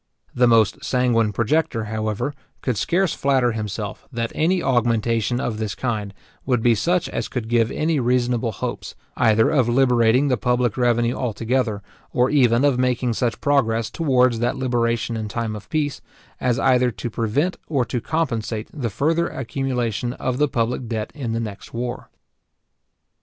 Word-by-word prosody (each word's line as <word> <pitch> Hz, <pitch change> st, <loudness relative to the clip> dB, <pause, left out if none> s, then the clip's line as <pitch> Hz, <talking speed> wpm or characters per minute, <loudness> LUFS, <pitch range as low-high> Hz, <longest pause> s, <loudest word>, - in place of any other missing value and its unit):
The 125 Hz, 0 st, +4 dB
most 115 Hz, -3 st, +3 dB
sanguine 120 Hz, -4 st, +2 dB
projector, 120 Hz, +2 st, 0 dB
however, 110 Hz, +5 st, -2 dB, 0.3 s
could 125 Hz, -, 0 dB
scarce 175 Hz, -, +1 dB
flatter 130 Hz, -3 st, +2 dB
himself, 105 Hz, -1 st, -5 dB
that 115 Hz, -2 st, -2 dB
any 175 Hz, +4 st, +2 dB
augmentation 115 Hz, -1 st, +1 dB
of 110 Hz, -4 st, -3 dB
this 110 Hz, -2 st, -3 dB
kind 110 Hz, -5 st, -2 dB, 0.3 s
would 125 Hz, -4 st, 0 dB
be 120 Hz, -, +5 dB
such 170 Hz, -, +1 dB
as -, -, -3 dB
could 120 Hz, -3 st, -4 dB
give 115 Hz, -1 st, +2 dB
any 155 Hz, -1 st, 0 dB
reasonable 120 Hz, -1 st, +1 dB
hopes, 100 Hz, -, -5 dB, 0.2 s
either 110 Hz, +4 st, +3 dB
of 130 Hz, -6 st, +2 dB
liberating 125 Hz, +1 st, +3 dB
the 125 Hz, -3 st, +2 dB
public 125 Hz, -1 st, +1 dB
revenue 120 Hz, -1 st, +2 dB
altogether, 115 Hz, -3 st, -1 dB, 0.3 s
or 125 Hz, +2 st, +2 dB
even 125 Hz, -2 st, +4 dB
of 135 Hz, -3 st, +2 dB
making 125 Hz, -1 st, +1 dB
such 115 Hz, +1 st, -1 dB
progress 115 Hz, -6 st, +1 dB
towards 125 Hz, -7 st, +2 dB
that 120 Hz, +1 st, 0 dB
liberation 120 Hz, -2 st, 0 dB
in 110 Hz, -1 st, -3 dB
time 110 Hz, 0 st, -3 dB
of 105 Hz, -, -10 dB
peace, 150 Hz, -2 st, -1 dB, 0.4 s
as 125 Hz, -1 st, +1 dB
either 125 Hz, -1 st, +3 dB
to 110 Hz, +1 st, -6 dB
prevent 125 Hz, +12 st, 0 dB
or 135 Hz, -6 st, +1 dB
to 120 Hz, 0 st, -3 dB
compensate 115 Hz, -9 st, -2 dB
the 130 Hz, -7 st, -3 dB
further 160 Hz, -, +1 dB
accumulation 125 Hz, -3 st, -2 dB
of 125 Hz, 0 st, -3 dB
the 150 Hz, -, +4 dB
public 120 Hz, -1 st, -1 dB
debt 110 Hz, -2 st, -3 dB
in 125 Hz, -7 st, -4 dB
the 115 Hz, -, -1 dB
next 105 Hz, -1 st, -7 dB
war. 120 Hz, 0 st, -4 dB
120 Hz, 160 wpm, -22 LUFS, 115-130 Hz, 0.4 s, be